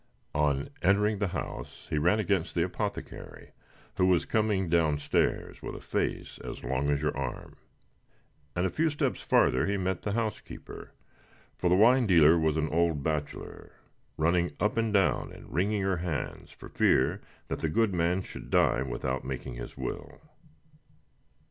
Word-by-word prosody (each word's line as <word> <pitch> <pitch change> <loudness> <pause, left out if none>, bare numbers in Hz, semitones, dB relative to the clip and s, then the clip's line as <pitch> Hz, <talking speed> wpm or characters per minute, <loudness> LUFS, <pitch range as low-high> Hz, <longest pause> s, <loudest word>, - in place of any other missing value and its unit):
On 75 -2 0
entering 105 +2 +3
the 100 - +1
house - - -6
he 75 - +1
ran 90 +8 +3
against 95 -4 0
the 85 - +3
apothecary, 100 +3 -5 0.5
who 90 - +4
was 90 -3 +3
coming 105 -4 +1
down 80 -3 +2
stairs, 75 - -1
with - - -6
a - - -7
face - - -3
as - - -7
long 65 +3 -1
as 70 0 +1
your 75 - 0
arm; 70 -2 -5 1.0
and 90 +1 +1
a - - 0
few 160 +1 +1
steps 145 - -1
farther 65 - +3
he 100 0 0
met 95 -1 -1
the 100 - -2
housekeeper 110 -1 -5 0.6
for 90 - 0
the 90 - +5
wine 120 +4 +5
dealer 85 -3 +6
was 80 -1 +1
an 80 -1 0
old 80 -3 +1
bachelor 75 -2 -4 0.4
running 85 +2 +2
up 105 - +1
and 115 -1 +1
down, 100 -3 +2
and - - -12
wringing 100 +3 +1
her 95 -1 +1
hands, 85 -5 -4
for - - -12
fear - - +2 0.3
that - - -3
the 80 - -1
good 110 +4 +2
man 90 +2 +1
should - - -10
die - - +3
without 65 0 -3
making 65 -1 -5
his - - -8
will. - - -6
85 Hz, 165 wpm, -29 LUFS, 75-100 Hz, 1.0 s, dealer